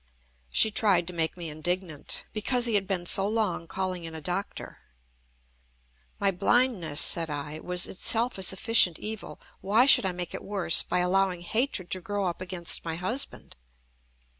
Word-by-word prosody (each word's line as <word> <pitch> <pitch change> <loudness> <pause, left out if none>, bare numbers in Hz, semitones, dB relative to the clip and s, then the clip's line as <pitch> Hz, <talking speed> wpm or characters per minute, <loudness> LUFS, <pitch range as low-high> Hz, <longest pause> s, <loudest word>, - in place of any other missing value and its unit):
She 220 - +3
tried 195 -5 +2
to 180 - -6
make 165 0 -1
me 170 -2 -5
indignant, 170 0 -1
because 240 +3 0
he 235 - +1
had 200 -2 +2
been 180 -3 -2
so 195 +2 +4
long 210 -6 -1
calling 185 -1 -4
in 165 -1 -8
a - - -4
doctor. 180 +5 -5 1.4
"My 200 -1 +3
blindness," 190 - +1
said 165 -1 +2
I, 145 +1 -5
"was 180 +2 +1
itself 230 +4 +1
a - - -5
sufficient 190 -1 +3
evil. 215 -1 -6 0.2
Why 215 +6 +3
should 270 -8 +5
I - - 0
make 175 -1 -5
it - - -5
worse 190 -5 +2
by 180 - -1
allowing 185 0 +1
hatred 220 -1 -2
to 185 - -1
grow 205 +1 -3
up 175 0 -4
against 180 -2 -2
my 165 -1 -4
husband?" 210 +11 -3
185 Hz, 165 wpm, -27 LUFS, 175-205 Hz, 1.4 s, should